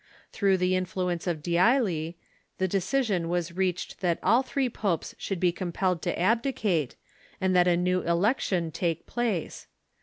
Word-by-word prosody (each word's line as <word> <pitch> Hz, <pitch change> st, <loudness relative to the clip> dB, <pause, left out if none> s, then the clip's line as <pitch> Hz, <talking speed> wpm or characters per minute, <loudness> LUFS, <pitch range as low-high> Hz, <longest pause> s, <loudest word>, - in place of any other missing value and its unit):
Through 195 Hz, -2 st, +2 dB
the 185 Hz, 0 st, +1 dB
influence 180 Hz, -1 st, -2 dB
of 160 Hz, -4 st, -2 dB
D'Ailly, 175 Hz, -, +2 dB, 0.4 s
the 190 Hz, -, +1 dB
decision 195 Hz, -2 st, 0 dB
was 175 Hz, -1 st, -1 dB
reached 185 Hz, -2 st, -2 dB
that 175 Hz, -3 st, +1 dB
all 230 Hz, +6 st, +5 dB
three 270 Hz, 0 st, -1 dB
popes 200 Hz, -8 st, -2 dB
should 195 Hz, -3 st, -3 dB
be 180 Hz, 0 st, +3 dB
com 175 Hz, 0 st, -4 dB
pelled 180 Hz, -1 st, 0 dB
to -, -, -2 dB
abdicate, 210 Hz, -, +1 dB, 0.4 s
and 190 Hz, -1 st, +1 dB
that 180 Hz, 0 st, +5 dB
a 175 Hz, -1 st, +4 dB
new 180 Hz, +1 st, +1 dB
election 175 Hz, -1 st, +1 dB
take 165 Hz, 0 st, -2 dB
place. 225 Hz, -9 st, -3 dB
185 Hz, 155 wpm, -27 LUFS, 170-200 Hz, 0.4 s, all